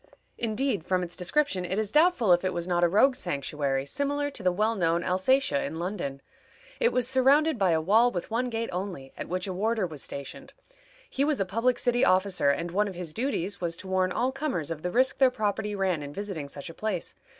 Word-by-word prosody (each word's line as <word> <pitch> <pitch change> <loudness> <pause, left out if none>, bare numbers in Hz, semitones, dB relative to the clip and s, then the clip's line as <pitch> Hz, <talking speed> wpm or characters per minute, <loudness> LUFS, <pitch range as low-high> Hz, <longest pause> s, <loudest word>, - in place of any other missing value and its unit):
Indeed, 225 - -1
from 185 +1 0
its 175 0 -5
description, 195 +1 0
it 185 +2 -3
is 215 -1 -1
doubtful 300 - +4
if 175 - +2
it 185 - -1
was 170 0 -3
not 175 -1 +1
a - - +6
rogue's 235 +9 +3
sanctuary, 140 -4 -2
similar 285 - -1
to 255 - -6
the 185 -1 +2
well 215 +5 +1
known 170 -2 +1
Alsatia 190 - +2
in 160 - -4
London. 170 -6 -4 0.6
It 475 -1 +3
was 250 -1 +1
surrounded 270 +2 +3
by 190 -2 +3
a 165 -1 +3
wall 215 +9 +4
with 180 -2 -5
one 245 +2 0
gate 230 0 -3
only, 180 -8 -5
at - - -6
which 185 +1 -2
a 190 - -3
warder 215 +2 0
was 155 -5 -7
stationed. 140 -1 -7 0.5
He 270 - -1
was 295 -1 +1
a 195 - +1
public 230 +6 +1
city 245 0 +1
officer, 185 -4 +3
and 165 +4 -1
one 205 +3 +1
of 190 - -6
his 170 -3 -6
duties 205 - -2
was 170 -1 -2
to 190 - -10
warn 185 -1 +1
all 250 +7 0
comers 265 - -3
of 155 -2 -4
the 180 - -2
risk 260 +7 +2
their 265 -1 +6
property 210 -3 -2
ran 190 -5 0
in 145 0 -7
visiting 195 -8 -5
such 140 0 -8
a - - -14
place. 200 -2 -3
195 Hz, 225 wpm, -27 LUFS, 175-245 Hz, 0.6 s, a